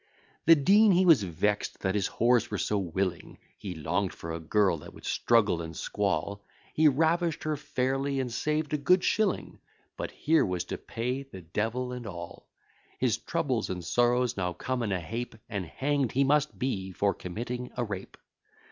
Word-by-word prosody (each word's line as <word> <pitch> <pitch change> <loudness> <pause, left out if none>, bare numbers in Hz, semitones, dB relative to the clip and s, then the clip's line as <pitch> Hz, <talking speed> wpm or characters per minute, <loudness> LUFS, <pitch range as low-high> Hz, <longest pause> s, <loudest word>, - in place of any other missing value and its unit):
The 165 - +10
dean 200 +8 +5
he 185 +1 +4
was 165 -9 +7
vex'd 100 +3 -1
that 95 -1 0
his 100 -2 0
whores 120 0 +2
were 105 - -2
so 105 +1 0
willing; 90 -1 -3 0.2
He 95 -3 -7
long'd 90 +5 -1
for 85 - -6
a 85 - -4
girl 95 +1 +2
that - - -12
would - - -12
struggle 105 -7 +2
and 80 -1 -7
squall; 100 0 -1 0.3
He 155 0 +5
ravish'd 165 +3 +2
her 155 -1 0
fairly, 135 0 -1
and 125 -3 -2
saved 150 +3 -1
a 150 - +1
good 180 +6 +4
shilling; 215 -4 0 0.4
But - - -3
here 160 +2 +2
was 90 -2 -1
to - - -6
pay 125 +4 -3
the 135 -9 -10
devil 115 +9 -2
and 125 -2 -6
all. 85 -3 -8 0.5
His 120 -4 +1
troubles 140 -9 -1
and 90 -2 -4
sorrows 120 +2 +2
now 90 -2 -1
come 130 +6 -3
in 110 -3 -1
a 95 - 0
heap, 115 +8 -5
And 100 -5 -4
hang'd 135 - -1
he 135 - +3
must 150 +2 +2
be 95 -8 -2
for 100 +2 +1
committing 120 +7 -5
a 120 - +1
rape. 100 -4 -6
120 Hz, 185 wpm, -29 LUFS, 95-140 Hz, 0.5 s, The